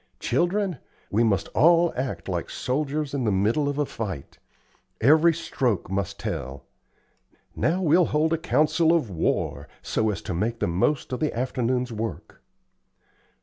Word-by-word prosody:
Children, 175 - 0 0.3
we 110 +4 +3
must 100 -3 +1
all 170 +2 +4
act 125 -10 -4
like - - -3
soldiers 145 +2 -2
in 140 -3 -1
the 110 - +1
middle 110 +10 +1
of 145 - -3
a 145 - +1
fight. 95 - -6 0.6
Every 155 +7 +5
stroke 125 - -2
must 100 0 -2
tell. 65 +1 -5 0.9
Now, 180 +4 0
we'll 170 +2 +4
hold 155 +2 +1
a - - +2
council 160 +2 +2
of 150 -12 0
war, 75 -3 -1 0.2
so 110 - 0
as 105 - -3
to - - -4
make 110 +7 -1
the - - -1
most 100 - 0
of 125 - -2
the 155 - 0
afternoon's 125 0 -1
work. 110 +1 -6
130 Hz, 150 wpm, -25 LUFS, 105-155 Hz, 0.9 s, Every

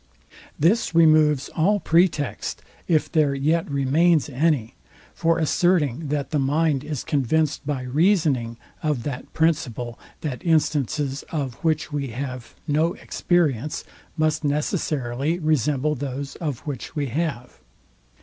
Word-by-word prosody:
This 175 +4 +2
removes 155 -4 +5
all 200 +6 +2
pretext, 165 -4 +1 0.2
if 155 -3 +1
there 150 -4 +2
yet 155 +4 +1
remains 145 +3 +2
any, 140 -4 0 0.4
for 165 0 +1
asserting 160 -3 +1
that 145 -1 -2
the 150 - +1
mind 145 0 +1
is 150 -5 -4
convinced 150 +2 0
by 140 -4 -2
reasoning 140 - +1 0.2
of 150 -6 -1
that 135 -2 -5
principle, 125 -7 0 0.2
that 140 -6 -4
instances 145 -3 +1
of 140 -6 -2
which 155 -1 0
we 140 -2 -1
have 125 0 -6
no 160 +3 +2
experience, 155 - 0 0.3
must 155 0 +1
necessarily 145 -1 -1
resemble 150 -2 +1
those, 140 0 -5
of 150 -7 -3
which 145 -1 -6
we 145 -2 0
have. 130 -2 -3
150 Hz, 120 wpm, -23 LUFS, 135-160 Hz, 0.4 s, removes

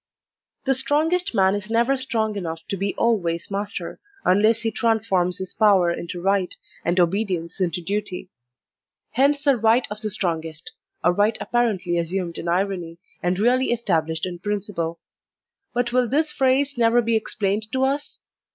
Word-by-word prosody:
The 270 - +3
strongest 300 +5 +1
man 190 -1 +4
is 205 +1 -4
never 235 +4 +2
strong 225 -5 -1
enough 165 -4 -5
to - - -1
be 195 +1 -2
always 175 -7 0
master, 200 -3 -4 0.3
unless 215 +4 +4
he 225 -1 0
transforms 210 -6 +1
his 190 -1 -4
power 195 -5 +4
into 170 +1 -6
right, 195 0 +1 0.3
and 175 +2 +1
obedience 180 -1 0
into 175 -1 -1
duty. 195 -1 -4 0.8
Hence 280 +3 +2
the 280 -3 +4
right 225 +3 +3
of 210 0 -4
the 215 - -2
strongest 165 -5 -2 0.2
— - - -49
a 175 - +5
right 210 +4 +2
apparently 195 -8 0
assumed 170 0 -3
in - - -6
irony, 175 -2 -1 0.2
and 180 +1 0
really 250 +5 +3
estab' 190 -10 +1
lished 160 +1 -3
in 175 -1 -6
principle. 190 -4 -3 0.7
But 240 0 -1
will 250 -2 +2
this 305 +3 +2
phrase 270 0 +1
never 235 +1 +4
be 230 0 +1
ex 220 - -1
plained 210 +1 -1
to 260 +2 0
us? 280 +2 -1
205 Hz, 165 wpm, -23 LUFS, 180-235 Hz, 0.8 s, a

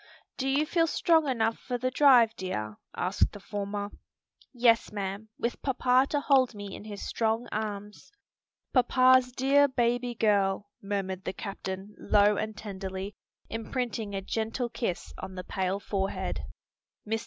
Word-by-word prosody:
"Do 265 - -2
you 280 +3 +2
feel 330 +1 +2
strong 320 -2 +3
enough 225 -3 +1
for 250 -2 -3
the 255 +1 -1
drive, 250 -5 +6
dear?" 110 - -4 0.2
asked 185 +3 +1
the 205 - -8
former. 205 0 -4 0.6
"Yes, 235 -3 +3
ma'am; 200 +1 -4
with 235 - -2
papa 260 0 +3
to 290 - +1
hold 260 -5 +3
me 205 -1 -7
in - - -10
his 205 -2 -6
strong 225 +1 0
arms." 210 -1 -5 0.6
"Papa's 255 0 +5
dear 275 +3 +4
baby 245 -1 0
girl!" 205 -2 +1
murmured 195 -2 -3
the - - -3
captain 195 0 -6
low 205 0 +4
and 215 +1 -3
tenderly, 195 -1 -5 0.3
imprinting 225 -2 -3
a 195 - -3
gentle 225 +4 -2
kiss 230 -7 -3
on 190 0 -7
the 185 - -5
pale 190 +1 -1
forehead. 195 -1 -2 0.6
Mr. 225 +1 0
220 Hz, 145 wpm, -29 LUFS, 200-250 Hz, 0.6 s, drive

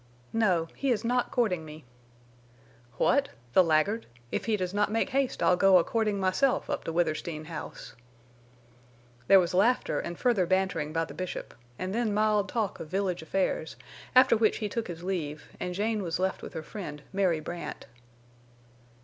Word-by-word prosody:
"No. 185 -7 +2
He 275 - -1
is 235 -4 +1
not 245 +1 +1
courting 210 -10 0
me." 155 -1 -11 1.1
"What? 280 0 +3 0.2
The 185 - +7
laggard! 165 +8 +1 0.2
If - - -2
he 220 -2 +1
does 185 -1 -3
not 205 0 +2
make 225 - 0
haste 270 -1 0
I'll 180 - +5
go 190 +1 +6
a 175 - +4
courting 215 -1 0
myself 190 +8 +1
up - - -2
to - - -2
Withersteen 155 -1 -1
House." 160 -1 -8 1.3
There 195 - +8
was 175 -1 0
laughter 220 +8 +2
and 175 - -5
further 225 -8 +2
bantering 185 -5 0
by 165 +1 0
the - - -10
Bishop, 185 -1 -5 0.2
and 185 +1 -3
then 225 -2 0
mild 210 -2 +2
talk 220 -5 -2
of - - -6
village 185 0 -1
affairs, 160 -1 -1 0.4
after 255 -2 +7
which 220 -1 +2
he 215 - -2
took 225 +3 -3
his 170 -1 -7
leave, 160 -6 -4
and 180 0 -3
Jane 215 +2 0
was 170 -3 -2
left 190 +1 -1
with - - -8
her 160 - -5
friend, 150 -6 -7
Mary 185 -5 +2
Brandt. 170 +3 -6
190 Hz, 175 wpm, -28 LUFS, 170-215 Hz, 1.3 s, There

